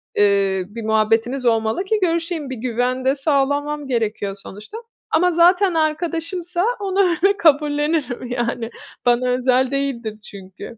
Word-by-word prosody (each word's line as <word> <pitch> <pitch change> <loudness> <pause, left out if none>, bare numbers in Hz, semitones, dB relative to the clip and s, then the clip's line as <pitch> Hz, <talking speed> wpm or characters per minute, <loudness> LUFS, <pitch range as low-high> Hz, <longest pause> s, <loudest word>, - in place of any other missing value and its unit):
eee, 195 -2 +2
bir 230 +2 -7
muhabbetimiz 225 +4 +1
olmalı 225 +6 +1
ki 430 +2 0
görüşeyim, 335 -4 -1
bir 260 - -4
güven 250 +2 -2
de 265 +1 +3
sağlamam 285 0 0
gerekiyor 215 -5 -2
sonuçta. 210 - -10 0.3
Ama 360 +3 +3
zaten 355 +3 +4
arkadaşımsa 335 +3 -1
onu 390 -1 -2
öyle 390 +4 +2
kabullenirim, 295 -5 +1
yani. 240 -1 -2 0.4
Bana 245 +1 +2
özel 255 +1 +2
değildir 245 -6 -3
çünkü. 195 +2 -11
265 Hz, 130 wpm, -20 LUFS, 230-330 Hz, 0.4 s, zaten